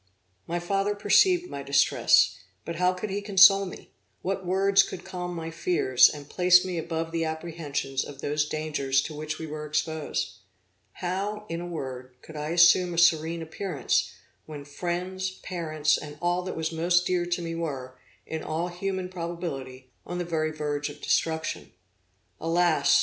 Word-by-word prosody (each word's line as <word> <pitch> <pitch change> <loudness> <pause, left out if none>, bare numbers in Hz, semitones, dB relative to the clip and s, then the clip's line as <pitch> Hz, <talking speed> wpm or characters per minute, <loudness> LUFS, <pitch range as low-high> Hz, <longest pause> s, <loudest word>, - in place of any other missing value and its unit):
My 170 - -1
father 195 +4 0
perceived 355 - +4
my 140 - -6
distress, 140 0 +4 0.3
but 170 0 -5
how 180 +1 +3
could 185 +3 -5
he 200 +1 -2
console 195 -1 +6
me? 180 - -11 0.3
What 190 -1 -2
words 195 +2 +4
could - - -6
calm 180 -1 -5
my 165 -1 -5
fears, 165 -6 +4
and 145 -1 -8
place 180 +2 +5
me 180 -2 -2
above 165 0 -3
the 165 0 -1
apprehensions 160 -4 -3
of 140 -2 -10
those 150 +1 -1
dangers 140 -3 0
to 155 - -6
which 155 +1 -5
we 160 - -6
were 155 0 -6
exposed? 155 0 -2 0.6
How, 200 +4 -3
in 165 +1 -3
a 175 - -5
word, 130 -6 -6
could 160 - -12
I 150 0 -4
assume 175 +1 +5
a - - -6
serene 165 -1 +3
appearance, 160 -4 -1 0.4
when 145 -2 -8
friends, 180 +5 -3
parents 155 -4 0
and 150 -1 -9
all 175 +1 0
that 185 - -5
was 160 0 -2
most 175 +2 +2
dear 180 -1 0
to 175 0 -1
me 165 0 -4
were, 135 -6 -5 0.3
in 160 -1 -4
all 165 +3 -2
human 185 +1 -3
probability, 165 -8 -6
on 175 - -5
the 175 - -2
very 160 -2 -1
verge 150 -2 -3
of - - -11
destruction? 160 -1 -1 0.7
Alas! 165 -2 +3
165 Hz, 165 wpm, -27 LUFS, 150-180 Hz, 0.7 s, console